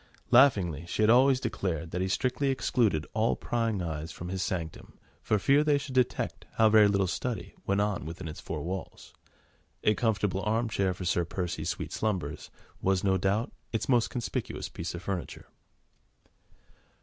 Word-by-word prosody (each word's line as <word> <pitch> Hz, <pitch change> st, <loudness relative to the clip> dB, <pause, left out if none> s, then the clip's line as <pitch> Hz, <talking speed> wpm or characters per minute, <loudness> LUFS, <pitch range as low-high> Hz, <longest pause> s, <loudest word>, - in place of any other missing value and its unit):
Laughingly 100 Hz, -, +5 dB
she 110 Hz, -, 0 dB
had 110 Hz, -, +6 dB
always 130 Hz, +2 st, +5 dB
declared 90 Hz, -, -3 dB
that 90 Hz, -, -2 dB
he 95 Hz, -, 0 dB
strictly 130 Hz, +7 st, 0 dB
excluded 115 Hz, -, +1 dB
all 110 Hz, +1 st, +2 dB
prying 115 Hz, -5 st, -1 dB
eyes 80 Hz, -1 st, -4 dB
from 85 Hz, -, -7 dB
his 95 Hz, 0 st, -3 dB
sanctum 85 Hz, -4 st, -4 dB, 0.2 s
for 110 Hz, -, +1 dB
fear 140 Hz, +8 st, +4 dB
they 150 Hz, -1 st, +3 dB
should 140 Hz, -1 st, -6 dB
detect 125 Hz, -1 st, 0 dB
how 110 Hz, -, +5 dB
very 105 Hz, -1 st, +7 dB
little 100 Hz, -1 st, +2 dB
"study" 110 Hz, +3 st, -3 dB
went 100 Hz, +1 st, +2 dB
on 105 Hz, -1 st, 0 dB
within 80 Hz, +3 st, -7 dB
its 75 Hz, -, -7 dB
four -, -, -5 dB
walls: 95 Hz, +2 st, -6 dB, 0.7 s
a 105 Hz, -, +4 dB
comfortable 105 Hz, -5 st, 0 dB
arm 110 Hz, +3 st, 0 dB
chair 95 Hz, -4 st, 0 dB
for 90 Hz, -, -6 dB
Sir 85 Hz, 0 st, +2 dB
Percy's 90 Hz, +1 st, -3 dB
sweet -, -, -4 dB
slumbers 105 Hz, -4 st, -2 dB, 0.3 s
was, 95 Hz, -1 st, +1 dB
no 95 Hz, -1 st, +3 dB
doubt, 100 Hz, +7 st, 0 dB, 0.2 s
its 115 Hz, -, -2 dB
most 120 Hz, -3 st, +3 dB
conspicuous 120 Hz, -3 st, -4 dB
piece 85 Hz, +1 st, -5 dB
of 85 Hz, -, -7 dB
furniture. 95 Hz, -3 st, -4 dB
100 Hz, 170 wpm, -29 LUFS, 90-115 Hz, 0.7 s, very